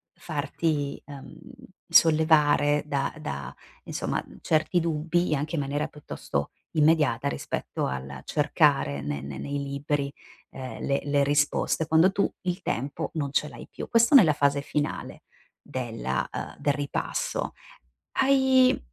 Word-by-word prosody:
farti, 150 -2 -2
uhm, 140 -2 -11 0.5
sollevare 150 -3 +5
da 140 -2 -1
da 70 - -5 0.3
insomma, - - -2
mhmm, - - -15
certi 160 +3 +2
dubbi, 165 +1 0
anche 150 +4 -2
in 150 - 0
maniera 145 +1 -2
piuttosto 70 - -5 0.2
immediata 150 -4 +3
rispetto - - -3
al 65 0 -5
cercare 145 - +2
ne 70 0 -3
ne 70 0 -7
nei 140 - -3
libri, 140 0 -2 0.4
ehm, 130 -4 -7
le 140 0 +1
le 145 -1 +2
risposte 145 +2 +1
quando 160 +4 +5
tu 200 - +1
il 180 +1 -2
tempo 145 +2 -3
non 145 -3 -2
ce 150 - +1
l'hai - - -10
più. - - -7
Questo 230 +4 +4
nella 175 - +8
fase 140 0 +2
finale 145 +1 -3 0.4
della 115 - -3
uhm, - - -6
del 145 - +1
ripasso. - - -2 0.7
Hai 265 -1 +4
145 Hz, 135 wpm, -26 LUFS, 140-160 Hz, 0.7 s, nella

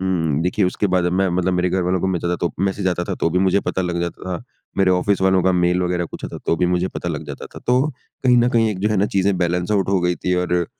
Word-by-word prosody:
उम, 80 -5 0
देखिए 90 +3 +1
उसके 95 +3 0
बाद 90 -1 +1
अब 90 - 0
मैं 95 +1 +2
मतलब 90 +1 0
मेरे 90 0 +1
घरवालों 90 0 0
को 95 - 0
मैं 90 -2 0
ज़्यादा 85 0 -1
तो 85 -3 -1
मैसेज 95 0 0
आता 90 -1 -1
था - - -3
तो 85 - +2
भी 90 - +1
मुझे 95 +1 +3
पता 95 - -2
लग 90 -1 -2
जाता 85 -1 -4
था। - - -11 0.4
मेरे 95 -1 +4
ऑफ़िस 95 +2 +1
वालों 95 -1 +3
का 95 - +3
मेल 90 0 +2
वग़ैरह 90 -1 0
कुछ - - -9
आता - - -6
था - - -10
तो 85 - +2
भी 90 - +1
मुझे 90 +1 0
पता 85 - -5
लग 80 -2 -4
जाता 70 -1 -7
था - - -7
तो 125 +1 +4 0.4
कहीं 125 -2 +5
न 120 +1 +4
कहीं 115 -2 +3
एक 100 - -4
जो 105 +3 +1
है 105 - 0
ना, 100 +2 +2
चीज़ें 100 -1 +1
बैलेंस 90 +1 0
आउट 100 -3 +1
हो 95 -1 +2
गई 90 0 +1
थी 90 - -1
और 90 -1 0
90 Hz, 300 wpm, -20 LUFS, 90-95 Hz, 0.4 s, कहीं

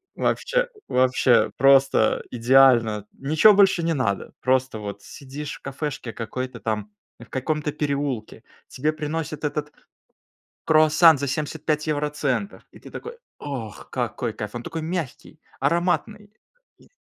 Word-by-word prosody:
вообще - - 0 0.2
вообще 130 -1 +3
просто 135 -4 +4
идеально, 120 -3 +4
ничего 155 +9 +4
больше 195 -3 +4
не 165 0 +1
надо, 110 -9 -2
просто 130 -2 +1
вот 100 -1 -7
сидишь 145 +1 -8
в - - -26
кафешке 135 -3 -5
какой-то 125 +3 -5
там, 105 -2 -3 0.3
в 120 - -11
каком-то 150 +3 -2
переулке, 140 -7 -3 0.3
тебе 150 +4 -1
приносят 155 0 -4
этот 150 0 -2 1.0
круассан 155 0 +5
за 140 - -2
75 150 +2 -2
евроцентов, 150 +4 -2
и - - -14
ты - - -13
такой: 470 +1 -8 0.2
"Ох, 120 -9 -7
какой 120 -1 -3
кайф". 105 -1 -7
Он 120 - -5
такой 165 +5 -5
мягкий, 160 -5 -5 0.2
ароматный, 195 +4 0 0.5
и - - -21
140 Hz, 125 wpm, -23 LUFS, 125-155 Hz, 1.0 s, круассан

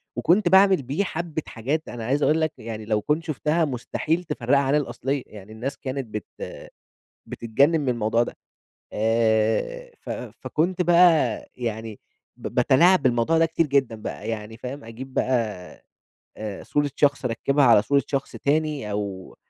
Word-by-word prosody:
وكنت 175 +1 +3
باعمل 190 -3 +6
بيه 140 +10 -1
حبة 165 -3 -4
حاجات، 140 +8 -2
أنا 115 -2 -6
عايز 140 +4 +1
أقول 160 +1 +3
لك 160 -1 +1
يعني 110 -2 -7
لو 105 -1 0
كنت 150 +7 0
شُفتها 155 +1 0
مستحيل 155 +6 -2
تفرقها 140 -3 +1
عن 140 +1 +1
الأصلية، 135 0 -2
يعني 105 0 -12
الناس 120 +6 -5
كانت 130 -2 -4
بت 105 -1 -6 1.0
بتتجنن 140 +8 +1
من 135 - -2
الموضوع 115 -1 +1
ده، - - -5 0.6
آآ، 115 - +1
ف - - -9
فكنت 175 +3 -2
بقى 170 -9 +4
يعني 110 -3 -5 0.4
ب - - -6
باتلاعب 175 +7 +4
بالموضوع 125 +6 +2
ده 165 - +4
كتير 165 0 0
جدًا 135 -5 +1
بقى، 110 0 -6
يعني 110 0 -5
فاهم، 130 +3 -7
أجيب 130 +4 -9
بقى، 130 - +1 1.0
آآ، 105 -2 -6
صورة 145 -1 0
شخص 140 -2 +2
أركبها 140 +4 +1
على 115 -4 +6
صورة 140 +3 +2
شخص 135 -1 -3
تاني، 145 -6 -1
أو 100 -2 -5
135 Hz, 155 wpm, -24 LUFS, 115-155 Hz, 1.0 s, باعمل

